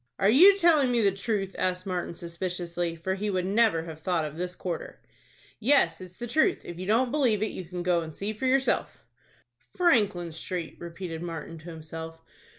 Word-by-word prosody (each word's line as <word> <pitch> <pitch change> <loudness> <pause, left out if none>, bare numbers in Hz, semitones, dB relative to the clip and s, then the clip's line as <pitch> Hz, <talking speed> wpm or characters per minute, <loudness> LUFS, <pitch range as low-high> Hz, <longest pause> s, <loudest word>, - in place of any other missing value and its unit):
"Are 195 +2 +4
you 380 - +8
telling 315 -8 +4
me 240 - +2
the 200 -2 +4
truth?" 195 0 -2
asked 185 0 -1
Martin, 180 -2 -3
suspiciously, 175 0 -3
for 170 +3 -2
he 205 +2 -2
would 185 -2 0
never 205 -4 +3
have 160 -2 -8
thought 165 -1 0
of 150 0 -6
this 180 +2 -4
quarter. 175 -3 -5 0.6
"Yes, 220 - +3
it's 180 -1 -11
the 240 - -5
truth. 310 - +1
If 175 0 -8
you 185 - -5
don't 235 +4 +2
believe 245 -8 +2
it, 215 - -1
you 185 - -7
can 175 +1 -5
go 175 -1 +2
and 160 -2 -8
see 205 +2 -3
for 240 +5 -2
yourself." 270 +1 +1 0.7
"Franklin 205 - +2
Street!" 165 +1 -5
repeated 170 -1 -6
Martin 165 -1 -6
to 155 - -17
himself. 165 0 -8
185 Hz, 190 wpm, -27 LUFS, 170-220 Hz, 0.7 s, you